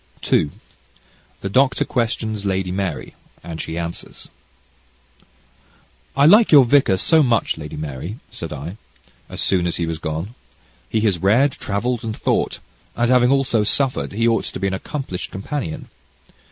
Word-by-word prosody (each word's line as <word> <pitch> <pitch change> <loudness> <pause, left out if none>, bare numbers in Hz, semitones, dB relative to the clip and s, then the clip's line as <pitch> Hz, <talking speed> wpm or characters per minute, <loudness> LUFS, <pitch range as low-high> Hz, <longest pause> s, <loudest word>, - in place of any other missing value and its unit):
CHAPTER - - +1
II 75 - +2 0.9
The 100 - -3
Doctor 135 +5 +2
Questions 110 -5 -2
Lady 95 -2 -1
Mary 95 0 -3 0.3
and 80 -2 -6
She 80 - -5
Answers 85 0 -7 1.9
"I 140 - +5
like 210 +8 +7
your 140 -4 +8
vicar 120 -7 +4
so 160 - +4
much, 120 -6 +2
Lady 75 -2 -8
Mary," 75 - -5
said 80 - -7
I, 75 +7 -6 0.5
as - - -4
soon 90 -2 +2
as 85 - -1
he 85 - -1
was 80 -1 -4
gone. 80 +8 -4 0.6
"He 110 - 0
has 100 -6 +1
read, 115 - +4
travelled, 115 +2 -2
and 110 -1 -4
thought, - - 0 0.4
and 120 +1 +1
having 125 -1 +5
also 135 -5 +2
suffered, 130 +2 0
he 115 +3 +1
ought 115 -1 +2
to - - -5
be 100 - -2
an 95 - 0
accomplished 95 -2 -5
companion." 100 - -5
105 Hz, 155 wpm, -21 LUFS, 85-125 Hz, 1.9 s, your